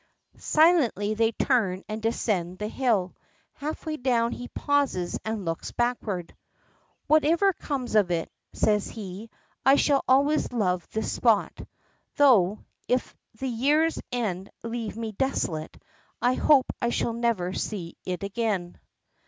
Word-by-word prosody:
Silently 295 - +3
they 225 +1 +2
turn 215 -6 +1
and 215 +1 -5
descend 200 -6 -1
the 210 - -3
hill. 215 -7 0 0.4
Halfway 310 +1 -5
down 240 -3 +1
he 245 - -6
pauses 280 -12 0
and 220 -3 -3
looks 165 0 -3
backward. 220 -8 -2 0.7
"Whatever 325 +6 +4
comes 270 -8 -4
of 210 -4 +4
it," 170 -2 -2 0.2
says 210 -1 +1
he, 205 +1 -8 0.3
"I 270 - +6
shall 285 -1 +3
always 285 +4 +3
love 185 -7 0
this 220 - -2
spot. 225 -4 +2 0.6
Though, 215 -9 +4 0.2
if 250 0 0 0.2
the 265 - -3
year's 290 +7 +2
end 200 -6 -2
leave 230 -2 -4
me 225 -1 -4
desolate, 195 - -2 0.4
I 245 +1 +2
hope 275 0 +4 0.2
I 235 - +1
shall 235 - -1
never 225 -6 0
see 180 -6 -4
it 180 +1 -4
again." 200 -4 -2
230 Hz, 130 wpm, -26 LUFS, 195-265 Hz, 0.7 s, I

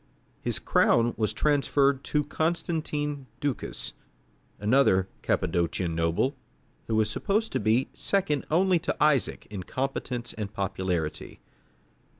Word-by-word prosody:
His - - -1
crown 115 0 +3
was 110 -2 +1
transferred 140 -2 +2
to 150 -1 +1
Constantine 155 -3 -2
Ducas, 125 - -2 0.7
another 105 -4 +3
Cappadocian 85 0 0
noble, 85 - +1 0.5
who 110 - 0
was 110 -1 +3
supposed 210 - 0
to - - 0
be 110 +5 +2
second 180 -8 0
only 180 +2 +3
to - - -2
Isaac 150 -4 +2
in 100 -3 -4
competence 125 +2 -3
and 105 -2 -5
popularity. 95 -5 -3
130 Hz, 115 wpm, -27 LUFS, 100-150 Hz, 0.7 s, crown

